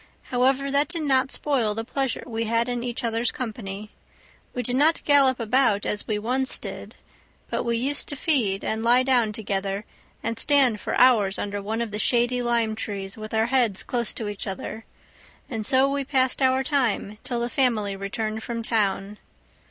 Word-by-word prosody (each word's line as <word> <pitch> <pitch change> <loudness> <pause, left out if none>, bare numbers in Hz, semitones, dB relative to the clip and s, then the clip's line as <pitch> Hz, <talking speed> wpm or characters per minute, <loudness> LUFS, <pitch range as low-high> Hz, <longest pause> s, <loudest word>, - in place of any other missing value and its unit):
However, 265 +2 +2
that 285 +1 +3
did 335 -3 -2
not 270 -2 +2
spoil 245 -8 0
the 225 - -3
pleasure 270 0 -2
we 230 -2 -3
had 230 +2 +1
in 245 -1 -3
each 245 +1 -4
other's 230 0 0
company; 210 -3 -6 0.6
we 250 - -3
did 245 +2 -1
not 305 +5 +3
gallop 275 -3 +4
about 230 -2 +2
as 210 - -2
we 215 - 0
once 255 +5 0
did, - - -8 0.6
but - - 0
we 235 -1 0
used 275 +5 +1
to 285 - -3
feed, 240 -10 +2
and 220 0 -2
lie 240 +2 +4
down 245 -4 +2
together, 200 -1 -3 0.4
and 230 0 -3
stand 270 -7 +4
for - - -3
hours 215 -6 +4
under 205 0 -3
one 220 +3 -2
of 225 - -6
the 210 - -3
shady 245 +2 +2
lime 235 -2 +1
trees 200 -3 -4
with 215 0 -8
our 220 0 +2
heads 235 -5 +1
close 240 -3 -1
to 220 - -4
each 205 0 -5
other; 210 +3 -6 0.7
and 220 -2 -2
so 265 0 +4
we 280 0 -1
passed 260 -1 +1
our 260 0 +3
time 245 -7 -1
till 240 -2 -3
the 235 - -1
family 230 -6 +1
returned 215 +3 -4
from 230 0 -4
town. 205 -2 -1
235 Hz, 185 wpm, -24 LUFS, 215-260 Hz, 0.7 s, gallop